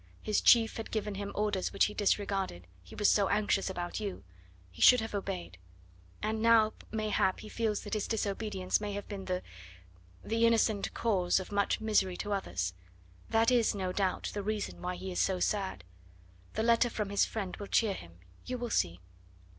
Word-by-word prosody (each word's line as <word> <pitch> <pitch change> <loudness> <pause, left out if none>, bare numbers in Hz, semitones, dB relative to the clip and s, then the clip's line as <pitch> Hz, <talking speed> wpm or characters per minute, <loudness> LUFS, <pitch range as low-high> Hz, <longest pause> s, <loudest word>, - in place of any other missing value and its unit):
His 215 - +1
chief 230 -2 +5
had 225 - -5
given 210 -2 -2
him 200 0 -5
orders 205 -3 0
which 200 - +3
he 210 - -3
disregarded 195 - 0 0.2
he 90 - -13
was 210 - +2
so 200 -2 +4
anxious 205 -2 +1
about 175 0 -4
you 200 - -5 0.5
he 90 - -12
should 250 - +8
have 225 -1 -5
obeyed; 190 - -4 0.6
and 220 +1 -1
now, 225 -1 +5 0.2
mayhap, 215 -3 0
he 215 - -9
feels 220 -3 -1
that 205 - -7
his 215 -2 -1
disobedience 200 -3 -1
may 205 -1 -3
have 205 0 -5
been 195 -2 -6
the 180 0 -2 0.8
the 230 +1 +2
innocent 220 -3 +2
cause 190 -6 +2
of 190 - -8
much 200 -1 +1
misery 210 -4 +1
to 205 -1 -3
others; 90 - -2 0.6
that 225 +2 +3
is, 235 -4 +3
no 185 -2 -2
doubt, 190 -2 -1
the 205 - -3
reason 210 +1 -3
why 180 0 -3
he 190 +1 -6
is 180 - -2
so 190 -2 +1
sad. 190 - -1 0.7
The 220 - -1
letter 235 +1 +4
from 210 -3 -3
his 200 - +3
friend 200 -5 -4
will 205 - -7
cheer 215 -1 +2
him, 85 - -11 0.3
you 255 - -4
will 240 -1 -4
see." 85 -1 0
205 Hz, 185 wpm, -31 LUFS, 190-220 Hz, 0.8 s, should